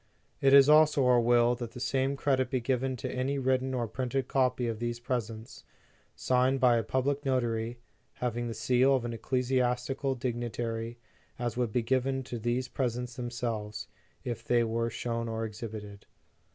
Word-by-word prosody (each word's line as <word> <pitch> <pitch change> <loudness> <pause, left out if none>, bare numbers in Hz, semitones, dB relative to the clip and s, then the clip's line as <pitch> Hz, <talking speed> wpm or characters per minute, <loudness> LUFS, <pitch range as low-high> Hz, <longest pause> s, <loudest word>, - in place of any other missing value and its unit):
" - - -40
It - - +7
is 140 0 +8
also 150 -2 +5
our 125 -1 +5
will 120 0 +4
that 120 -2 -6
the - - -8
same 135 +2 0
credit 135 -2 +1
be 130 - 0
given 130 +1 -1
to 120 - -5
any 130 +2 -1
written 130 0 0
or 120 -2 -1
printed 130 +3 -2
copy 130 -2 +1
of 115 -2 -3
these 120 0 -3
presents, 115 -2 -4 0.5
signed 130 +1 +2
by 125 -2 +5
a 115 - 0
public 135 +5 -1
notary, 120 -3 -1 0.4
having 120 -1 -2
the 115 - -4
seal 125 +4 +3
of 125 -2 -1
an 120 - -3
ecclesiastical 125 +2 0
dignitary, 120 -2 -3 0.4
as 120 -2 -2
would 120 -3 -1
be 120 +2 0
given 130 +2 0
to 125 -2 -6
these 120 +3 -1
presents 125 -2 -3
themselves, 120 -4 -4 0.4
if 120 -2 -4
they 120 -1 +2
were 115 +1 -1
shown 115 0 -3
or 115 0 -2
exhibited. 105 -2 -8
125 Hz, 170 wpm, -30 LUFS, 115-130 Hz, 0.5 s, is